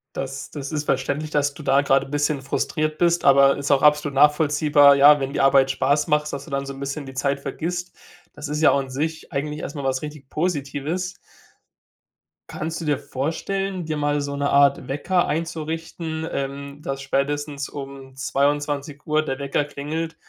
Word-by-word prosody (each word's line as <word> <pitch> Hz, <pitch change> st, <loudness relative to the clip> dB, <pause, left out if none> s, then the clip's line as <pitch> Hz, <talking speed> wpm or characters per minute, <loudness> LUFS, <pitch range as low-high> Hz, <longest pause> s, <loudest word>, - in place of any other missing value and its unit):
Das 135 Hz, 0 st, -5 dB
das 140 Hz, -2 st, -6 dB
ist 150 Hz, -1 st, -2 dB
verständlich, 140 Hz, +4 st, -1 dB
dass 145 Hz, -1 st, +1 dB
du 150 Hz, -, -11 dB
da 140 Hz, 0 st, +4 dB
grade 135 Hz, -1 st, +2 dB
bisschen 145 Hz, 0 st, 0 dB
frustriert 155 Hz, +3 st, -2 dB
bist, 170 Hz, 0 st, +2 dB
aber 140 Hz, 0 st, +6 dB
ist 140 Hz, +1 st, -2 dB
auch 140 Hz, -, +4 dB
absolut 150 Hz, -1 st, +3 dB
nachvollziehbar, 145 Hz, 0 st, +5 dB
ja, 145 Hz, +1 st, +7 dB
wenn 135 Hz, 0 st, -3 dB
die -, -, 0 dB
Arbeit 135 Hz, 0 st, +5 dB
Spaß 145 Hz, +3 st, +1 dB
macht, 150 Hz, -1 st, +2 dB
sodass 140 Hz, -2 st, -6 dB
du 155 Hz, -, -13 dB
dann 140 Hz, 0 st, -1 dB
so 140 Hz, -, -6 dB
'n 135 Hz, -, -11 dB
bisschen 140 Hz, +1 st, -4 dB
die 135 Hz, -, -9 dB
Zeit 140 Hz, +1 st, -1 dB
vergisst. 175 Hz, +6 st, -4 dB, 0.4 s
Das 145 Hz, -, -7 dB
ist 150 Hz, +1 st, -2 dB
ja 160 Hz, -, +6 dB
auch 140 Hz, -, +2 dB
an 135 Hz, -1 st, -5 dB
sich 155 Hz, +5 st, -4 dB
eigentlich 150 Hz, +2 st, -3 dB
erst 140 Hz, -, -6 dB
mal 140 Hz, -, -5 dB
was 130 Hz, -1 st, 0 dB
richtig 150 Hz, -3 st, -9 dB
Positives. 160 Hz, +2 st, -2 dB, 1.3 s
Kannst 160 Hz, +1 st, -4 dB
du 165 Hz, -, -5 dB
dir 145 Hz, -2 st, +1 dB
vorstellen, 185 Hz, +8 st, -3 dB
dir 155 Hz, -1 st, -3 dB
mal 145 Hz, 0 st, 0 dB
so 140 Hz, 0 st, -4 dB
'ne 140 Hz, 0 st, -1 dB
Art 140 Hz, -2 st, +4 dB
Wecker 175 Hz, +6 st, 0 dB
einzurichten, 160 Hz, 0 st, -4 dB
ähm, 140 Hz, +1 st, -5 dB
dass 135 Hz, -1 st, -4 dB
spätestens 145 Hz, +1 st, -2 dB
um 135 Hz, -2 st, -9 dB
22:00 145 Hz, +2 st, 0 dB
der 135 Hz, -4 st, -3 dB
Wecker 140 Hz, +1 st, -1 dB
klingelt 155 Hz, +3 st, -4 dB
145 Hz, 185 wpm, -23 LUFS, 140-155 Hz, 1.3 s, ja